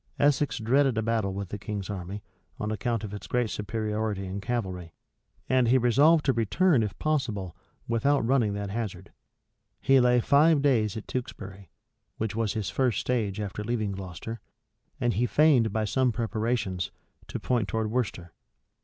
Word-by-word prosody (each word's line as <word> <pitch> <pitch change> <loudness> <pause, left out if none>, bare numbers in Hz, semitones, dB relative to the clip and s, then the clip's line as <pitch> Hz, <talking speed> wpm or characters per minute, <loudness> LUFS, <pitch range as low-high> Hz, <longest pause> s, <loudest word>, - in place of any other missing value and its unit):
Essex 145 0 +2
dreaded 130 +2 +2
a 110 - +1
battle 110 -3 0
with 100 -1 -5
the 105 - -5
king's 100 -2 -4
army, 100 +1 -6 0.4
on 105 0 -2
account 110 +1 -1
of 105 -1 -6
its 105 - -7
great 125 -3 0
superiority 105 -1 -2
in 95 +2 -5
cavalry; 95 -7 -4 0.5
and 130 -2 +3
he 125 +3 +5
resolved 145 +6 +4
to 135 - +3
return, 125 - +2
if 105 -2 -3
possible, 115 - -1 0.3
without 120 +3 +2
running 120 -4 +2
that 100 -1 -4
hazard. 100 -4 -5 0.7
He 135 +3 +4
lay 125 0 +4
five 145 +4 +4
days 115 -7 +2
at 110 - -6
Tewkesbury, 100 -7 -6 0.5
which 110 -2 -2
was 115 -2 0
his 110 -3 -3
first 130 -4 +1
stage 110 -5 -1
after 105 0 -4
leaving 110 -2 -1
Gloucester; 95 +4 -7 0.6
and 120 -3 +1
he 120 +3 +1
feigned, 135 -6 +4
by 110 +1 0
some 130 +3 +2
preparations, 110 -4 -1 0.4
to - - -5
point 120 -5 0
towards 110 0 -2
Worcester. 100 -8 -2
110 Hz, 160 wpm, -27 LUFS, 100-125 Hz, 0.7 s, he